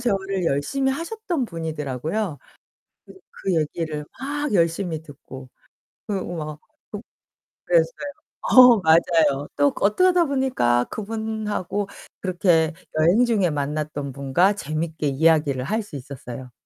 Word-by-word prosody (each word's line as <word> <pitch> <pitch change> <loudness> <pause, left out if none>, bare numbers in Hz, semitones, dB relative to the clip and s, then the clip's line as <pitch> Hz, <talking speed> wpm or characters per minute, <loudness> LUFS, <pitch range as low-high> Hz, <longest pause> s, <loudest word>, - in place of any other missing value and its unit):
재활을 195 -5 -1
열심히 265 - 0
하셨던 340 - -3
분이더라고요. 160 - -3 0.7
그 - - -14 0.3
그 190 -3 +1
얘기를 155 -1 -2 0.2
막 290 +1 -3
열심히 165 -2 +1
듣고. 135 -3 -12 0.6
그리고 190 -4 -3
막 155 -1 -6 0.3
독 210 - -6 0.6
그랬어요. - - +1 0.3
어 250 -2 +8
맞아요. 160 -3 +3
또 145 0 +4
그 - - -1
어떡하다 360 - +4
보니까 260 - +1
그분하고 215 -2 -3 0.3
그렇게 175 -3 +2 0.3
여행 180 +10 +4
중에 205 -7 +2
만났던 145 0 -3
분과 140 +9 +2
재밌게 155 -2 -3
이야기를 145 -2 +2
할 220 +7 0
수 185 - -11
있었어요. 130 -2 -8
170 Hz, 275 characters per minute, -23 LUFS, 150-220 Hz, 0.7 s, 어